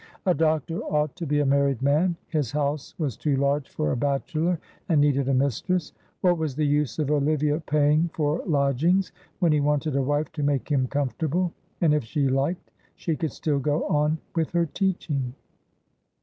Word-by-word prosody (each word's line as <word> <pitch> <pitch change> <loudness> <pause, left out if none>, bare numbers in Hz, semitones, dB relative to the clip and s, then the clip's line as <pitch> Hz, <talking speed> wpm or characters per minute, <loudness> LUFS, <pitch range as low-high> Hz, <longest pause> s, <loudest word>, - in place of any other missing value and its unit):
A 185 - +4
doctor 160 0 0
ought 150 -1 -1
to 170 -3 -4
be 145 +1 +2
a - - +1
married 140 -2 +2
man, 155 +6 +3
his 150 -8 -1
house 145 -1 -2
was 145 - -2
too 145 +3 0
large 140 +1 0
for 75 - -1
a - - 0
bachelor, 155 +6 0 0.3
and 160 -4 +4
needed 140 -2 +2
a - - +2
mistress. 140 - 0 0.3
What 175 -2 +3
was 155 -5 -2
the 155 +1 +1
use 145 -1 +1
of 150 -2 0
Olivia 150 +1 +1
paying 150 +1 +2
for 150 +1 0
lodgings 155 +5 +2 0.3
when 170 -3 +3
he 150 - +3
wanted 150 0 0
a 140 - +2
wife 145 +4 0
to 160 -2 -5
make 140 -1 0
him 130 -3 +2
comfortable? 155 +6 -1 0.3
And 160 -4 +4
if 150 -3 +1
she 140 +4 0
liked 140 +7 -1 0.2
she 165 - -2
could 160 -2 -2
still 145 +1 -1
go 145 +3 0
on 150 +1 +2 0.2
with 165 -2 +1
her 170 -1 +3
teaching. 150 -8 -2
150 Hz, 185 wpm, -25 LUFS, 140-160 Hz, 0.3 s, A